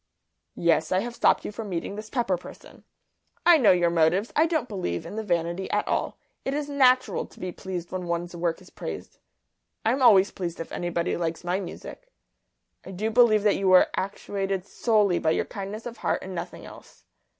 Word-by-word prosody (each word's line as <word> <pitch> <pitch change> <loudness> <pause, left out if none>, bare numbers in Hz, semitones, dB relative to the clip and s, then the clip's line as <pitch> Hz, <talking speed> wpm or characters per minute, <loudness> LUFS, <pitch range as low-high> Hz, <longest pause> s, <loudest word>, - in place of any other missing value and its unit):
"Yes, 165 -2 +2
I 185 +1 +2
have 240 +2 -5
stopped 235 - +2
you - - -4
from 210 0 -7
meeting 180 +2 -3
this 215 +1 -8
Pepper 235 -8 0
person. 175 - -13 0.6
I 340 -2 +7
know 235 - +5
your 175 -2 +3
motives. 170 +6 +2
I 315 +2 +4
don't 315 -7 -1
believe 185 - -3
in - - -7
the 220 - -2
vanity 175 -1 -1
at 210 - 0
all. - - -1 0.3
It 270 - -2
is 295 -1 -2
natural 260 -3 +3
to - - -18
be 185 - -4
pleased 175 -2 -6
when 185 -1 -4
one's 170 +1 -3
work 170 +1 -2
is 185 - -17
praised; - - -7 0.7
I'm 250 +5 +2
always 205 -6 +6
pleased 175 -3 -5
if 165 - -6
anybody 175 0 -2
likes 165 -1 -3
my 180 +2 0
music. 195 - -9 0.8
I - - -11
do 210 +4 -2
believe 220 -3 +5
that 210 -1 +3
you 195 - -1
were 185 0 +6
actuated 195 -1 -3
solely 210 -4 +2
by 160 - +1
your - - +1
kindness 200 +3 -7
of 240 -1 -7
heart - - -1
and 190 - -7
nothing 175 - -6
else. - - -15
195 Hz, 195 wpm, -26 LUFS, 175-220 Hz, 0.8 s, I